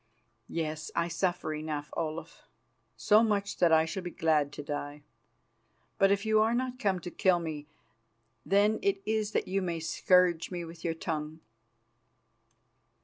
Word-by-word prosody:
"Yes, 155 -1 -3
I 170 - +1
suffer 175 -1 -1
enough, 150 -1 -5
Olaf. 160 0 -5 0.5
So 210 +1 +5
much 200 -3 0
that 175 -2 +4
I 160 0 +5
shall 190 +4 -4
be 180 - -5
glad 155 -4 +1
to 145 - -7
die. 145 0 -5 1.0
But 195 - +5
if 200 +1 +1
you 215 0 +4
are 225 +2 +2
not 255 0 -2
come 195 -3 +1
to 175 - -7
kill 185 -3 +3
me, 155 -3 -5 0.8
then 205 +3 +3
it 395 -1 +1
is 215 -1 0
that - - 0
you 195 +1 0
may 170 -3 -2
scourge 175 +1 +2
me 175 -2 -5
with 165 0 -11
your 165 -1 -1
tongue." 155 -1 -4
170 Hz, 155 wpm, -30 LUFS, 160-200 Hz, 1.0 s, So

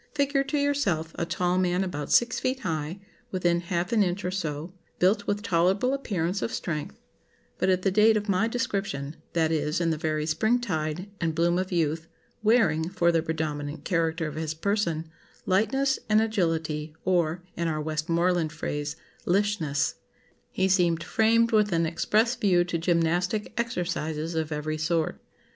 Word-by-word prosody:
Figure 280 -1 +2
to 295 - -1
yourself 260 - 0
a 170 - -3
tall 180 +1 +1
man 180 0 +1
about 150 -6 -4
six 240 +1 +4
feet 260 +1 -1
high, 160 +1 -3 0.3
within 175 -2 +1
half 175 +1 -2
an 225 -2 +3
inch 185 0 0
or 180 - -1
so, 165 -2 -4 0.2
built 190 +5 +2
with 205 +1 -1
tolerable 190 +6 +2
appearance 195 -8 -1
of - - -2
strength; 150 - -4 0.6
but 185 - +2
at 185 -1 +2
the 195 - +2
date 215 +2 +5
of 210 0 -3
my 200 +2 +2
description 195 - -2 0.2
(that 160 -1 +2
is, 150 +1 0
in 170 -1 +1
the 155 - -2
very 155 -1 -1
spring 220 +10 +2
tide 170 -4 -2
and 165 -2 0
bloom 170 +2 +2
of 185 0 -3
youth) 160 -1 0 0.3
wearing, 215 -8 +3
for 175 -2 +2
the 165 -1 +2
predominant 155 -2 -3
character 165 -2 0
of 155 - -4
his 155 0 -3
person, 170 -3 -1 0.4
lightness 270 +8 +2
and 215 0 +5
agility 160 -8 -1
or 175 -2 +1
(in 170 0 -1
our 155 -1 -1
Westmoreland 165 +2 0
phrase) 150 -1 -3 0.3
lishness, 180 -6 +1 0.5
he 190 - +1
seemed 175 -3 +2
framed 230 +3 +3
with 210 -2 +3
an 165 -1 +2
express 215 +8 +2
view 195 -8 +3
to 175 -1 -2
gymnastic 175 +5 0
exercises 170 -8 -2
of 160 -1 -2
every 155 +1 -2
sort. 160 0 0
175 Hz, 165 wpm, -27 LUFS, 160-205 Hz, 0.6 s, date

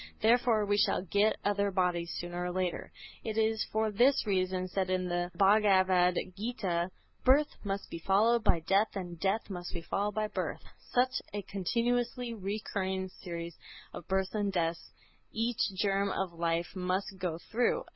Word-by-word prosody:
Therefore 230 -1 +3
we 205 0 +2
shall - - +2
get 205 +3 +3
other 200 0 +2
bodies, 180 -3 0
sooner 175 0 -4
or 180 - -2
later. 185 -1 -2 0.3
It 220 -1 -3
is 220 0 +2
for 220 0 +1
this 245 +7 +4
reason 185 -2 0
said 185 0 -1
in 185 -1 0
the 175 0 -1
"Bhagavad 190 -3 +4 0.2
Gîtâ": 195 -5 -1 0.3
"Birth 285 +3 +4
must 200 -1 -3
be 170 - -5
followed 215 +6 +3
by 175 -6 +3
death 195 +7 +2
and 175 -3 -5
death 195 +4 0
must 175 -1 -5
be 170 - -4
followed 205 +4 -1
by 215 0 0
birth." - - -4 0.3
Such 255 +1 +2
a 205 - -3
continuously 235 +5 -1
recurring 190 -2 -3
series 170 -2 -7 0.4
of 175 - -8
births 190 0 0
and 205 -2 0
deaths 165 -2 -2 0.4
each 230 +1 -1 0.2
germ 200 0 +1
of 190 -3 -2
life 170 +1 -1
must 185 +1 -2
go 175 -3 -2
through. 240 - 0
195 Hz, 160 wpm, -31 LUFS, 180-215 Hz, 0.4 s, this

